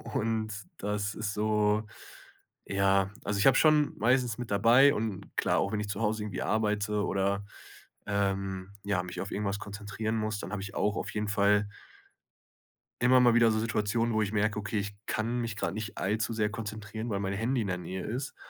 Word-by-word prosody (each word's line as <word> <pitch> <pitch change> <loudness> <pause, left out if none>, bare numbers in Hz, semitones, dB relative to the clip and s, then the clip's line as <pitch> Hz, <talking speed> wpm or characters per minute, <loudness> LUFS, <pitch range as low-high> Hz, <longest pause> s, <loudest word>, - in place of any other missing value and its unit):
und 110 0 0 0.3
das 105 0 -2
ist 105 -2 -3
so, 105 0 +1 0.8
ja 95 -1 +2
Also 100 0 -1
ich 105 - +5
habe 135 - +6
es - - +5
schon 155 -2 +4
meistens 120 0 +2
mit 120 -4 -6
dabei, 120 +8 +6
und, 105 -5 -4
klar, - - +2
auch 100 - 0
wenn 105 - 0
ich 105 - -4
zu 100 +2 -3
Hause 105 0 0
irgendwie 105 -3 -4
arbeite 105 -1 0
oder, 100 +1 0 0.6
ähm, 95 -1 -1
ja, 100 -3 0
mich 90 - -6
auf 100 - -5
irgendwas 100 0 -2
konzentrieren 105 +2 -4
muss, 110 -1 -2
dann - - -6
habe 105 -2 -3
ich 100 -1 -8
auch 105 0 +1
auf - - -3
jeden 105 -1 -2
Fall 100 0 +3 1.3
immer 125 +1 +6
mal 120 -2 +5
wieder 120 -1 +5
so 110 - +1
Situationen, 115 +1 0
wo 110 - +2
ich 100 0 -2
merke: 105 0 +1
„Okay, 105 +1 -2
ich 100 0 -3
kann 120 +2 -1
mich 115 -3 -3
grade - - -2
nicht 110 -2 -5
allzu 110 +4 0
sehr 105 -1 +1
konzentrieren, 110 +1 -5
weil 100 -1 -1
mein 95 0 -2
Handy 120 +4 0
in - - -3
der 90 -1 -2
Nähe 90 +1 -5
ist.“ 130 +5 -4
105 Hz, 200 wpm, -30 LUFS, 100-110 Hz, 1.3 s, habe